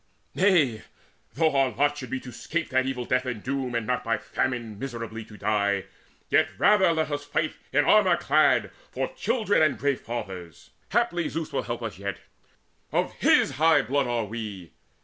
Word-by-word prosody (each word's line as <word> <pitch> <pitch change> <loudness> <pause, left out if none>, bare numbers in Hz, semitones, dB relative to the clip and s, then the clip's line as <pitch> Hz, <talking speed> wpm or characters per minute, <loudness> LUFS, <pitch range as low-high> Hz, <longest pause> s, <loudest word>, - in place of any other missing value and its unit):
Nay, 155 - +3 0.5
though 160 -3 +2
our 135 -1 +4
lot 145 +5 +1
Should 130 -3 -7
be 130 - -2
to 125 - -9
escape 160 +7 -3
that 130 0 +2
evil 125 -2 -3
death 130 +1 0
and 115 -5 -4
doom, 130 -2 -2
And 115 -2 -1
not 125 +1 -1
by 115 -1 0
famine 115 -2 -3
miserably 115 -4 -5
to 105 - -13
die; 100 -2 0 0.4
Yet - - +3
rather 195 -4 +5
let 160 -2 -1
us 145 0 -2
fight 155 +2 -1 0.2
in 150 +1 +3
armour 210 -3 +5
clad - - +3 0.2
For - - -3
children 215 -8 +1
and 155 -2 +3
grey 140 0 +1
fathers! 95 - -7 0.2
Haply 175 -1 +1
Zeus 160 -1 -5
Will - - 0
help 120 0 -5
us 110 -4 -5
yet; 100 0 -4 0.7
of - - 0
his - - +4
high 160 0 +5
blood 135 +3 0
are 120 -2 -1
we. 105 -5 -7
125 Hz, 180 wpm, -26 LUFS, 110-150 Hz, 0.7 s, rather